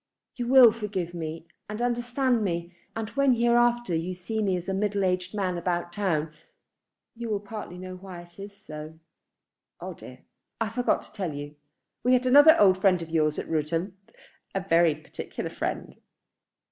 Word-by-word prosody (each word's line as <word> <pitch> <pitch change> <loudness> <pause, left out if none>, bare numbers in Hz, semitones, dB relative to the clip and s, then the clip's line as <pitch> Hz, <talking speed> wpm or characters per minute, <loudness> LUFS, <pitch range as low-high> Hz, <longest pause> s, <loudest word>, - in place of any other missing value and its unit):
You 245 -2 -3
will 250 -2 +8
forgive 205 -6 -4
me 160 -1 -5 0.2
and 210 +1 -5
understand 245 0 +1
me, 170 -2 -3 0.2
and 225 -1 -3
when 275 -1 +3
hereafter 240 -2 +2
you 170 +3 -2
see 220 +5 -3
me 190 -3 +1
as 175 - -7
a 190 - -1
middle 200 0 0
aged 180 +2 -1
man 185 -4 -1
about 175 0 -2
town, 165 -6 -1 0.8
you 235 0 -5
will 210 -2 0
partly 205 -3 -8
know 185 0 -7
why 185 -2 -9
it 175 +2 -19
is 200 0 -9
so. 155 -1 -9 0.8
Oh - - -6
dear; - - -13 0.4
I 225 -1 0
forgot 245 +2 0
to - - -18
tell 185 -8 -3
you. 145 +1 -7 0.5
We 250 +2 +4
had 255 0 +3
another 290 +5 +8
old 190 -2 +5
friend 190 -3 +4
of 165 - -10
yours 155 -2 +1
at - - -4
Rudham, 165 +4 -1 0.6
a 195 - 0
very 165 -3 +4
particular 155 0 -7
friend." - - -4
190 Hz, 170 wpm, -27 LUFS, 170-230 Hz, 0.8 s, will